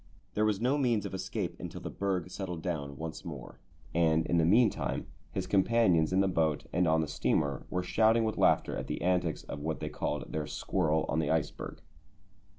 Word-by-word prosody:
There 105 Hz, -, +2 dB
was 105 Hz, -2 st, +1 dB
no 130 Hz, +5 st, +2 dB
means 120 Hz, -6 st, +1 dB
of -, -, -5 dB
escape 95 Hz, -, -3 dB
until -, -, -6 dB
the -, -, -5 dB
berg 95 Hz, -3 st, -2 dB
settled 90 Hz, -5 st, -5 dB
down 70 Hz, -6 st, -3 dB
once 80 Hz, 0 st, -6 dB
more, 70 Hz, -7 st, -8 dB, 0.3 s
and 80 Hz, -1 st, +3 dB
in 85 Hz, -, +2 dB
the 80 Hz, -, +4 dB
meantime 110 Hz, +5 st, +2 dB, 0.3 s
his 95 Hz, -, -2 dB
companions 95 Hz, -4 st, +3 dB
in 95 Hz, +1 st, +3 dB
the 95 Hz, -, +3 dB
boat 80 Hz, -4 st, +1 dB
and 90 Hz, +1 st, +3 dB
on 80 Hz, 0 st, +3 dB
the 80 Hz, -, -1 dB
steamer 70 Hz, -2 st, 0 dB
were 90 Hz, 0 st, -1 dB
shouting 110 Hz, +4 st, +3 dB
with 110 Hz, -1 st, -1 dB
laughter -, -, +3 dB
at -, -, -4 dB
the -, -, -3 dB
antics 90 Hz, -2 st, +1 dB
of 70 Hz, -, -6 dB
what 80 Hz, +1 st, -2 dB
they -, -, -3 dB
called -, -, -3 dB
their 75 Hz, -1 st, -2 dB
squirrel 80 Hz, -4 st, 0 dB
on 80 Hz, -, 0 dB
the 75 Hz, -, 0 dB
iceberg. 80 Hz, -2 st, -2 dB
90 Hz, 200 wpm, -31 LUFS, 80-100 Hz, 0.3 s, the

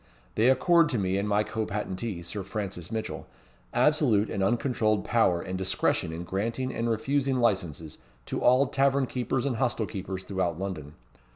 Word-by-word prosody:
They 115 Hz, +4 st, +3 dB
accord 165 Hz, +5 st, +4 dB
to 130 Hz, -, 0 dB
me 95 Hz, -1 st, 0 dB
and 105 Hz, +1 st, -2 dB
my 105 Hz, +1 st, +3 dB
co 110 Hz, +1 st, -3 dB
patentee, 100 Hz, -2 st, -4 dB
Sir 100 Hz, +4 st, -5 dB
Francis 95 Hz, -3 st, -5 dB
Mitchell, 110 Hz, -1 st, -4 dB, 0.4 s
absolute 125 Hz, -9 st, +3 dB
and 100 Hz, -, -2 dB
uncontrolled 110 Hz, -1 st, +1 dB
power 110 Hz, -7 st, +3 dB
and 95 Hz, 0 st, -4 dB
discretion 95 Hz, -3 st, 0 dB
in 80 Hz, +2 st, -5 dB
granting 115 Hz, +8 st, -2 dB
and 115 Hz, +1 st, -1 dB
refusing 135 Hz, +4 st, 0 dB
licenses 90 Hz, -, -1 dB, 0.3 s
to -, -, -3 dB
all 130 Hz, +3 st, +5 dB
tavern 135 Hz, 0 st, +2 dB
keepers 125 Hz, +1 st, -2 dB
and 130 Hz, -5 st, -1 dB
hostel 120 Hz, -3 st, 0 dB
keepers 95 Hz, -1 st, -5 dB
throughout 95 Hz, -4 st, -2 dB
London. 85 Hz, -6 st, -5 dB
110 Hz, 165 wpm, -28 LUFS, 95-125 Hz, 0.4 s, all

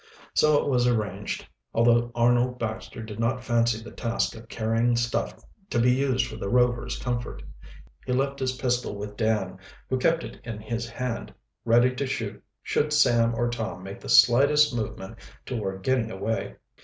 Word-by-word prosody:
So 150 Hz, -1 st, +4 dB
it -, -, 0 dB
was 125 Hz, -3 st, +2 dB
arranged, 110 Hz, -4 st, -2 dB, 0.3 s
although 120 Hz, +1 st, +3 dB
Arnold 120 Hz, +1 st, +3 dB
Baxter 110 Hz, -1 st, -5 dB
did 110 Hz, -1 st, -8 dB
not 120 Hz, +2 st, 0 dB
fancy 115 Hz, -2 st, +2 dB
the -, -, -10 dB
task 115 Hz, 0 st, -1 dB
of 115 Hz, 0 st, -12 dB
carrying 115 Hz, +2 st, +1 dB
stuff 120 Hz, 0 st, -1 dB, 0.3 s
to -, -, -1 dB
be 125 Hz, +1 st, +4 dB
used 130 Hz, -1 st, +1 dB
for 110 Hz, -, -8 dB
the 100 Hz, -, -4 dB
Rovers' 125 Hz, 0 st, +1 dB
comfort. 120 Hz, -1 st, -4 dB, 0.6 s
He -, -, -1 dB
left 135 Hz, +2 st, 0 dB
his 130 Hz, -1 st, 0 dB
pistol 125 Hz, -4 st, -1 dB
with 105 Hz, 0 st, -6 dB
Dan, 105 Hz, -4 st, -1 dB, 0.3 s
who 130 Hz, -, +1 dB
kept 165 Hz, +5 st, +2 dB
it -, -, -9 dB
in 115 Hz, -3 st, -6 dB
his 115 Hz, +2 st, -4 dB
hand, 125 Hz, 0 st, -4 dB, 0.3 s
ready 120 Hz, +2 st, +4 dB
to 135 Hz, +1 st, -2 dB
shoot 110 Hz, -6 st, -4 dB, 0.2 s
should 150 Hz, +1 st, 0 dB
Sam 115 Hz, -5 st, +4 dB
or 120 Hz, +1 st, +1 dB
Tom 110 Hz, -7 st, -4 dB
make 95 Hz, +1 st, -8 dB
the -, -, -8 dB
slightest 140 Hz, +4 st, +6 dB
movement 110 Hz, -1 st, -5 dB, 0.3 s
toward 95 Hz, -6 st, -4 dB
getting 125 Hz, -1 st, +1 dB
away. 110 Hz, +2 st, -3 dB
120 Hz, 170 wpm, -26 LUFS, 110-125 Hz, 0.6 s, slightest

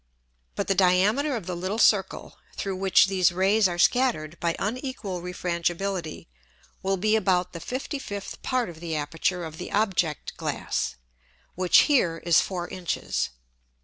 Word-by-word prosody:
But -, -, -2 dB
the 195 Hz, -, +3 dB
Diameter 200 Hz, +10 st, +3 dB
of 215 Hz, -7 st, -5 dB
the 180 Hz, -, -4 dB
little 185 Hz, +5 st, -3 dB
Circle, 200 Hz, -4 st, +2 dB, 0.2 s
through 195 Hz, -1 st, -2 dB
which 190 Hz, 0 st, +5 dB
these 190 Hz, -2 st, +2 dB
Rays 195 Hz, +4 st, +3 dB
are 175 Hz, -1 st, -4 dB
scattered 175 Hz, -, +2 dB
by 170 Hz, -1 st, 0 dB
unequal 215 Hz, -5 st, -4 dB
Refrangibility, 175 Hz, 0 st, -3 dB, 0.5 s
will 195 Hz, 0 st, 0 dB
be 215 Hz, +3 st, +2 dB
about 185 Hz, -4 st, +1 dB
the 170 Hz, -, -6 dB
55th 250 Hz, -, -5 dB
Part 255 Hz, -2 st, 0 dB
of 170 Hz, -3 st, -10 dB
the 165 Hz, -1 st, -4 dB
Aperture 165 Hz, +4 st, -1 dB
of 160 Hz, 0 st, -9 dB
the 180 Hz, -, -6 dB
Object 185 Hz, -7 st, 0 dB
glass, -, -, -2 dB, 0.6 s
which 180 Hz, 0 st, +5 dB
here 215 Hz, -, +2 dB
is 170 Hz, -2 st, +5 dB
four 175 Hz, -2 st, -4 dB
Inches. 180 Hz, -, -2 dB
185 Hz, 145 wpm, -26 LUFS, 175-210 Hz, 0.6 s, which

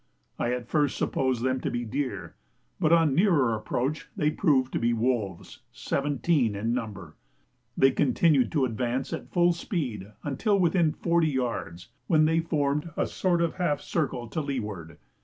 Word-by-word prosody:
I 120 Hz, -, 0 dB
at 125 Hz, -1 st, -3 dB
first 145 Hz, -2 st, +1 dB
supposed 130 Hz, -3 st, 0 dB
them 130 Hz, 0 st, +1 dB
to -, -, -1 dB
be 120 Hz, 0 st, -3 dB
deer, 110 Hz, -, -4 dB, 0.5 s
but 155 Hz, -, +2 dB
on 165 Hz, -2 st, +5 dB
a -, -, -2 dB
nearer 150 Hz, -, +3 dB
approach 125 Hz, +7 st, -2 dB
they 150 Hz, 0 st, +2 dB
proved 140 Hz, -6 st, +1 dB
to -, -, 0 dB
be 120 Hz, 0 st, +1 dB
wolves, 110 Hz, -6 st, -2 dB
seventeen 140 Hz, -4 st, 0 dB
in 110 Hz, +4 st, -1 dB
number. 110 Hz, -6 st, -5 dB, 0.6 s
They 135 Hz, 0 st, +5 dB
continued 135 Hz, -1 st, +2 dB
to 145 Hz, -4 st, +2 dB
advance 125 Hz, +3 st, -2 dB
at -, -, -6 dB
full 175 Hz, -1 st, +3 dB
speed 125 Hz, -, -4 dB
until 200 Hz, -, +1 dB
within 170 Hz, -3 st, +3 dB
forty 170 Hz, 0 st, +1 dB
yards, 105 Hz, -, -3 dB, 0.2 s
when 155 Hz, -2 st, +4 dB
they 160 Hz, +1 st, +2 dB
formed 150 Hz, -1 st, -1 dB
a -, -, +2 dB
sort 175 Hz, -2 st, 0 dB
of 170 Hz, -, -2 dB
half 150 Hz, -6 st, 0 dB
circle 135 Hz, -7 st, -2 dB
to 155 Hz, -, -2 dB
leeward. 105 Hz, -, -5 dB
135 Hz, 165 wpm, -27 LUFS, 120-160 Hz, 0.6 s, on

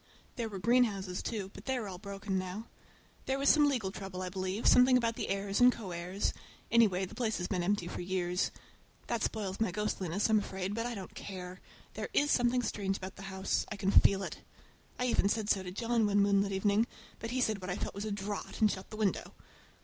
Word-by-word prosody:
There 230 Hz, -2 st, -2 dB
were 200 Hz, -, -6 dB
greenhouses, 200 Hz, -4 st, +2 dB
too, 200 Hz, -4 st, -4 dB
but -, -, -11 dB
they 265 Hz, -1 st, 0 dB
are 225 Hz, -4 st, -3 dB
all 185 Hz, -2 st, -7 dB
broken 195 Hz, -1 st, -3 dB
now. 185 Hz, +4 st, -5 dB, 0.6 s
There 265 Hz, -, +1 dB
was 275 Hz, 0 st, +3 dB
some 295 Hz, -1 st, +6 dB
legal 225 Hz, -9 st, -1 dB
trouble, 190 Hz, -2 st, -6 dB
I 185 Hz, -, -3 dB
believe, 190 Hz, +3 st, -3 dB
something 250 Hz, +1 st, +7 dB
about 230 Hz, -2 st, 0 dB
the -, -, -3 dB
heirs 195 Hz, +2 st, 0 dB
and 250 Hz, 0 st, +8 dB
co 215 Hz, -7 st, -7 dB
heirs; 180 Hz, +4 st, -2 dB, 0.4 s
anyhow, 205 Hz, -5 st, +4 dB
the -, -, -11 dB
place 225 Hz, -3 st, -1 dB
has 175 Hz, -, -2 dB
been 185 Hz, -3 st, -1 dB
empty 185 Hz, 0 st, 0 dB
for -, -, -5 dB
years. 180 Hz, 0 st, 0 dB, 0.6 s
That 235 Hz, -2 st, -2 dB
spoils 200 Hz, -4 st, -2 dB
my 225 Hz, -, +2 dB
ghostliness, 195 Hz, -1 st, -1 dB
I 220 Hz, -, +1 dB
am 215 Hz, -, +6 dB
afraid; 190 Hz, -1 st, -3 dB
but 230 Hz, +2 st, -1 dB
I 240 Hz, -, -4 dB
don't 190 Hz, -3 st, -8 dB
care—there 185 Hz, -2 st, -8 dB
is 290 Hz, 0 st, +4 dB
something 245 Hz, 0 st, +3 dB
strange 195 Hz, -3 st, -1 dB
about 190 Hz, 0 st, -7 dB
the -, -, -11 dB
house—I 190 Hz, +2 st, -1 dB
can 195 Hz, -1 st, 0 dB
feel 195 Hz, -1 st, +5 dB
it. -, -, -6 dB, 0.6 s
I 250 Hz, -, 0 dB
even 235 Hz, -5 st, +2 dB
said 215 Hz, -1 st, +1 dB
so 195 Hz, -, +2 dB
to 185 Hz, -, -6 dB
John 230 Hz, +2 st, +1 dB
one 205 Hz, 0 st, +3 dB
moonlight 200 Hz, 0 st, +3 dB
evening, 205 Hz, +3 st, +2 dB, 0.3 s
but 230 Hz, -, -5 dB
he 255 Hz, +2 st, -1 dB
said 220 Hz, -5 st, +1 dB
what 185 Hz, -, -5 dB
I 180 Hz, -, -1 dB
felt -, -, -4 dB
was 200 Hz, +2 st, -5 dB
a 215 Hz, -, -3 dB
draught, 200 Hz, 0 st, -4 dB
and 215 Hz, -2 st, +5 dB
shut 190 Hz, 0 st, -6 dB
the 215 Hz, -, -8 dB
window. 210 Hz, -3 st, -1 dB
200 Hz, 225 wpm, -32 LUFS, 190-230 Hz, 0.6 s, and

